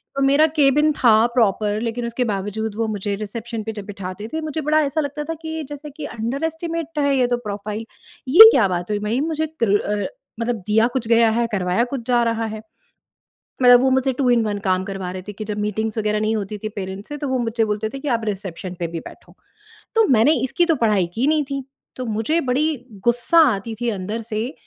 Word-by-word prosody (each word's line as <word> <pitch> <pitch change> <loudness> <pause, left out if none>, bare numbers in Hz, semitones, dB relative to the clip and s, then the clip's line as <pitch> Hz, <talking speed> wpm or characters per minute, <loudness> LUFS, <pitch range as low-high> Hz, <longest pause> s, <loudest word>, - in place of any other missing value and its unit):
तो 275 - -1
मेरा 310 +3 +5
केबिन 295 +2 +4
था, 235 -6 +4 0.2
प्रॉपर, 210 -1 +2
लेकिन 235 +1 -3
उसके 235 +2 -1
बावजूद 205 +2 -4
वो 225 0 -1
मुझे 200 +1 -2
रिसेप्शन 220 +2 -5
पे 220 - -4
जब 200 - -6
बिठाते 195 +1 -7
थे, 320 - -2
मुझे 310 0 -3
बड़ा 305 +1 +2
ऐसा 295 +3 -1
लगता 290 +1 -4
था 325 - -4
कि 320 -1 -4
जैसे 295 +1 -8
कि 290 +1 -8
अंडरएस्टिमेट 320 +6 -3
है 280 -1 +2
ये 250 -1 +3
तो 245 0 0
प्रोफ़ाइल। 210 +2 -5 0.4
"ये 435 +11 +11
क्या 215 -6 +4
बात 175 +1 -3
हुई, 205 - 0
भई? 215 +5 -1
मुझे 315 0 -1 0.2
कर 205 -1 +3
अ, 205 0 -2 0.3
मतलब 235 +1 -1
दिया 220 +2 +4
कुछ 245 -4 -2
गया 230 -1 +5
है, 235 +1 +1
करवाया 185 +2 +1
कुछ 260 - -2
जा 240 -1 +3
रहा 230 -1 0
है।" 215 0 -6 1.0
मतलब 245 0 +8
वो 265 0 +2
मुझसे 265 0 +2
2 255 0 0
इन 235 -1 +4
1 205 -1 -2
काम 185 -2 0
करवा 190 -2 -5
रहे 185 - -6
थे 210 - -4
कि 215 +2 -7
जब 210 0 -3
मीटिंग्स 215 +2 -2
वगैरह 210 0 0
नहीं 215 +1 0
होती 210 0 -4
थी 215 - -4
पैरेंट्स 190 +1 -6
से, 295 - -5
तो 290 -1 -4
वो 260 -1 0
मुझसे 230 -1 0
बोलते 210 +1 -2
थे 275 - -7
कि, 290 - -4
"आप 230 -3 0
रिसेप्शन 190 -3 -5
पे 170 - 0
भी 165 - -3
बैठो।" - - -14 0.6
तो 450 -1 +5
मैंने 245 +8 +5
इसकी 345 +7 +1
तो 325 -2 +2
पढ़ाई 200 -5 +2
की 245 +4 +1
नहीं 305 -1 +2
थी। 275 -1 -3 0.3
तो 255 - -5
मुझे 305 +10 +1
बड़ी 290 +4 +1 0.3
गुस्सा 245 +8 +4 0.2
आती 225 +4 -6
थी 240 - +1
अंदर 210 +2 -4
से, 225 +4 -4
230 Hz, 225 wpm, -21 LUFS, 210-275 Hz, 1.0 s, ये